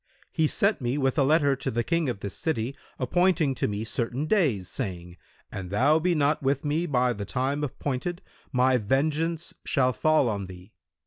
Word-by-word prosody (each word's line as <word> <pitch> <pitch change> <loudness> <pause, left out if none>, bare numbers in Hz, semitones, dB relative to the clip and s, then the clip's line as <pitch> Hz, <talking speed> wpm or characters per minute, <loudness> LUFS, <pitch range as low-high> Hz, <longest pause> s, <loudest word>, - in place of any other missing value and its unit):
He 160 - +2
sent 200 +2 +1
me 125 +3 -1
with 135 +1 +1
a - - +5
letter 145 -1 +3
to 135 - -3
the 120 +1 -1
King 165 -2 0
of 100 -5 -4
this 100 - -4
city 135 -4 -2 0.2
appointing 165 +2 +2
to - - -1
me 105 +1 -3
certain 120 +5 -2
days, 145 - +1
saying, 90 -5 -5 0.4
'An 95 -2 -6
thou 140 - +3
be 175 +1 +1
not 150 +1 +2
with 140 +1 0
me 155 +4 0
by 125 -4 +2
the 100 -2 -5
time 135 +7 -1
appointed, 145 +5 -3 0.3
my 125 0 +3
vengeance 155 +8 -1
shall 130 -2 +2
fall 155 -2 +3
on 100 -3 -2
thee.' 90 +2 -12
135 Hz, 185 wpm, -26 LUFS, 115-155 Hz, 0.4 s, a